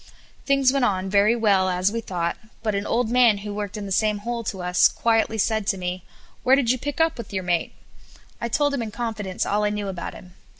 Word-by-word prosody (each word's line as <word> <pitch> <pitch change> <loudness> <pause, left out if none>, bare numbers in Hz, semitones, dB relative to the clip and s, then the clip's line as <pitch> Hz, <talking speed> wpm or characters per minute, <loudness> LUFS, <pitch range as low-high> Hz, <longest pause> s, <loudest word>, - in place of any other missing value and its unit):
Things 275 -2 +3
went 275 -2 +1
on 190 -4 0
very 205 +3 +4
well, 200 -5 +3
as 185 +2 +1
we 230 +1 -3
thought, 175 -5 -2 0.3
but 215 -2 0
an 200 +1 -2
old 235 -1 0
man 240 -4 +5
who 205 - -4
worked 205 0 -4
in 205 - -5
the 195 -1 -1
next 210 -1 -1
hole 235 0 -3
to 190 -3 -4
us, 180 0 +5
quietly 225 -1 +1
said 220 -1 0
to 195 - +1
me: 180 0 -4 0.4
"Where 260 +1 +5
did 255 -4 +2
you 255 - -1
pick 290 +3 -4
up 325 -4 +2
with 235 - -7
your 190 -2 -2
mate?" 175 -1 -1 0.7
I 235 - -2
told 290 +4 +1
him 275 - -1
in 225 - -4
confidence 210 -4 -3
all 210 +1 0
I 210 - +2
knew 205 -1 -3
about 185 -3 -6
him. 180 -1 -13
210 Hz, 240 wpm, -23 LUFS, 190-235 Hz, 0.7 s, man